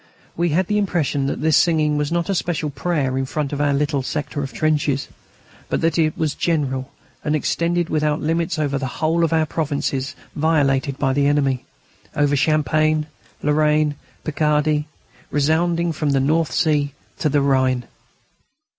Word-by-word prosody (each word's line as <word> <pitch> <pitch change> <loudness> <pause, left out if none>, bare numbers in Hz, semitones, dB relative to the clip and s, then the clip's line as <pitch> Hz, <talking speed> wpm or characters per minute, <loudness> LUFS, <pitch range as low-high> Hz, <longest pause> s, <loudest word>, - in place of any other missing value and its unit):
We 170 +1 +1
had 175 +5 +2
the 210 +3 +1
impression 155 -8 0
that - - -3
this 155 -1 +3
singing 155 -3 +3
was 150 +1 -1
not 170 0 0
a 200 - 0
special 165 -4 -1
prayer 140 -3 -1
in 135 - -2
front 145 0 -2
of 145 - -1
our 145 -1 +2
little 145 0 0
sector 145 +2 -3
of 135 -1 -4
trenches, 150 -3 0 0.6
but - - 0
that 165 0 +1
it 155 -1 +1
was 155 -2 0
general, 140 -5 -1 0.3
and 150 - +1
extended 170 +3 0
without 150 -1 +1
limits 165 0 -1
over 145 -3 0
the 135 - -2
whole 165 +2 +1
of 165 - +1
our 160 -1 +3
provinces 140 -4 -2 0.2
violated 140 -3 +1
by 135 -2 +1
the 140 +1 +2
enemy: 140 -3 +1 0.5
over 145 -1 +2
Champagne, 155 +1 +2 0.4
Lorraine, 150 0 +3
and - - -10 0.3
Picardy, 150 0 +1 0.4
resounding 165 +3 +1
from 150 -1 -2
the 140 -1 +2
North 155 +2 +1
Sea 145 -1 +1 0.2
to 155 - +1
the 145 0 +2
Rhine. 130 -2 +2
150 Hz, 165 wpm, -21 LUFS, 140-160 Hz, 0.6 s, this